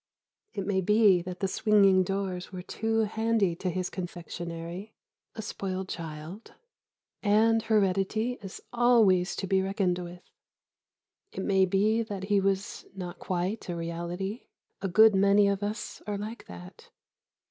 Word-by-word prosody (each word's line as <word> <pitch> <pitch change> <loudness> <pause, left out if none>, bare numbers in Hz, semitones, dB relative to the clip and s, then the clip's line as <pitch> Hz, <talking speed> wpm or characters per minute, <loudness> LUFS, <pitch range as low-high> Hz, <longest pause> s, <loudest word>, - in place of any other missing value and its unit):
It 195 - -3
may 190 -1 +1
be 210 -2 +4
that 180 +1 -7
the 195 - +2
swinging 195 -2 +4
doors 185 -1 -3
were 180 -1 -7
too 225 +3 -1
handy 220 -4 +1
to 185 - -2
his 185 0 -3
confectionery... 175 +2 -6 0.4
a 220 - -5
spoiled 190 -2 -4
child... 165 +5 -7 0.7
and 225 +2 +4
heredity 215 +2 +1
is 195 -1 -8
always 225 -7 +4
to - - -3
be 190 0 +2
reckoned 190 -2 0
with. 175 0 -8 1.1
It 190 - -5
may 190 -2 +3
be 210 +5 +2
that 205 -4 -5
he 200 0 +2
was 195 0 -2
not 180 -2 -7
quite 185 +3 -3
a 175 - -2
reality... 170 +6 -4 0.4
a 195 - -1
good 220 +4 +6
many 200 +1 +5
of 200 0 0
us 210 +2 -4
are 205 -1 -2
like 215 +3 -7
that.... 90 0 -12
195 Hz, 145 wpm, -28 LUFS, 180-210 Hz, 1.1 s, good